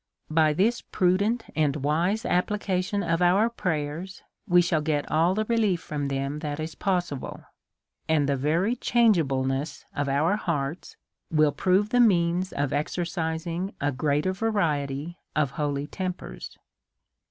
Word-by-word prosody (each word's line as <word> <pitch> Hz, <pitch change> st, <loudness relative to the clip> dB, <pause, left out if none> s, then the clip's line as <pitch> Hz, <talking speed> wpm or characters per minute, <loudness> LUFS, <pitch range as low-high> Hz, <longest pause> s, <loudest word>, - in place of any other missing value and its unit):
By 155 Hz, -1 st, +4 dB
this 215 Hz, +9 st, +1 dB
prudent 200 Hz, +5 st, +1 dB
and 150 Hz, -3 st, +2 dB
wise 165 Hz, -, 0 dB
application 190 Hz, +1 st, 0 dB
of 165 Hz, 0 st, 0 dB
our 195 Hz, +6 st, +4 dB
pray 160 Hz, -10 st, -1 dB
ers, 175 Hz, +6 st, -8 dB, 0.2 s
we 180 Hz, -2 st, +5 dB
shall 170 Hz, -3 st, +2 dB
get 150 Hz, -1 st, -1 dB
all 165 Hz, +4 st, +3 dB
the 215 Hz, +1 st, 0 dB
relief 215 Hz, -6 st, +1 dB
from 145 Hz, -3 st, -4 dB
them 140 Hz, +2 st, -2 dB
that 150 Hz, -1 st, -4 dB
is 155 Hz, +1 st, -4 dB
possi 175 Hz, -7 st, -1 dB
ble; -, -, -8 dB, 0.7 s
and 150 Hz, -3 st, +3 dB
the 140 Hz, -, +1 dB
very 165 Hz, -, +1 dB
changeableness 145 Hz, -, +1 dB
of 145 Hz, -1 st, -1 dB
our 155 Hz, +9 st, +2 dB
hearts 155 Hz, -5 st, -3 dB, 0.3 s
will 155 Hz, -2 st, +3 dB
prove 190 Hz, -, +1 dB
a 245 Hz, -, +4 dB
means 180 Hz, -4 st, +3 dB
of 140 Hz, -2 st, -1 dB
exercising 165 Hz, +3 st, -2 dB
a 145 Hz, +1 st, 0 dB
greater 145 Hz, +6 st, 0 dB
variety 165 Hz, -7 st, -1 dB, 0.2 s
of 145 Hz, -4 st, +1 dB
holy 145 Hz, -2 st, -2 dB
tempers. 185 Hz, +3 st, -6 dB
165 Hz, 140 wpm, -26 LUFS, 145-190 Hz, 0.7 s, we